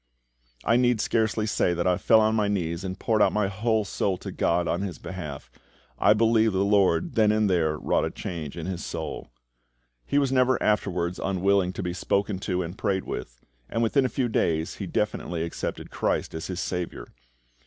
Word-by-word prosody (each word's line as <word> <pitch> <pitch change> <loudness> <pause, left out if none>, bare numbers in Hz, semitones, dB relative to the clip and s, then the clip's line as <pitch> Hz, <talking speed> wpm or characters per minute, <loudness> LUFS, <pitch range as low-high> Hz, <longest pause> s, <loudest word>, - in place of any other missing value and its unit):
I 115 - +4
need 125 -2 +3
scarcely 110 -1 +1
say 90 -4 +1
that 85 - -1
I 90 -1 +3
fell 110 -1 +5
on 110 0 +3
my 105 -2 +2
knees 85 -3 -2
and 95 0 -4
poured 110 +1 +1
out - - +5
my 105 -2 +1
whole 110 +2 0
soul 95 0 -1
to - - -7
GOD 85 0 +1
on 85 - 0
his 95 -5 -4
behalf. 75 -9 -7 0.5
I 105 - +6
believe 110 0 +3
the 95 +1 +2
LORD 100 -5 +2
then 110 -2 +4
and 110 0 +2
there 80 -5 +1
wrought - - +1
a - - -1
change 80 -3 -6
in 80 - -5
his 90 -2 -4
soul. - - -5 0.8
He 140 - -1
was 140 -2 +2
never 130 -1 +3
afterwards 90 -4 0
unwilling 95 0 +2
to 95 - -5
be 90 -1 -2
spoken 100 +1 -1
to 90 -2 -1
and 85 +2 -6
prayed 95 -1 -1
with, - - -7 0.2
and 115 +1 0
within 135 +5 +3
a 130 - +1
few 130 -1 0
days 80 -7 0
he - - -5
definitely 85 -2 -2
accepted 85 - -5
CHRIST - - -1
as 80 0 -5
his 90 -1 -4
SAVIOUR. 90 -3 -3
95 Hz, 195 wpm, -26 LUFS, 85-110 Hz, 0.8 s, I